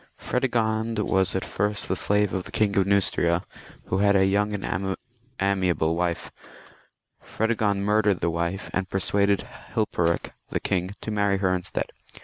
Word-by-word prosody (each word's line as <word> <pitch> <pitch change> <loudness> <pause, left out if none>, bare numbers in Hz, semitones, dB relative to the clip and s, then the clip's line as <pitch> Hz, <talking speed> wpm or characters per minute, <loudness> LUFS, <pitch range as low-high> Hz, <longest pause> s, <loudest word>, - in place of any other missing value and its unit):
Fredegond 115 -3 0
was 95 -3 +1
at 95 - -1
first 105 +1 +1
the - - 0
slave 105 -1 +1
of 95 -1 -2
the - - -10
King 105 -2 +1
of 95 -1 +3
Neustria, 90 -3 +2 0.4
who 95 - -1
had 100 0 +4
a 95 -1 +5
young 100 +2 +2
and 95 -1 -2 0.4
amiable 95 -4 +1
wife; 85 -1 -2 0.9
Fredegond 110 -3 0
murdered 105 -2 +2
the 85 - 0
wife, 85 +3 -3
and 95 -1 -1
persuaded 100 +1 +2 0.3
Hil 110 - +3
perik 85 -4 0 0.2
the - - -1
king 95 +1 -1
to 110 - -4
marry 100 -2 +2
her 95 -1 +1
instead. 90 -1 -3
100 Hz, 155 wpm, -25 LUFS, 90-105 Hz, 0.9 s, a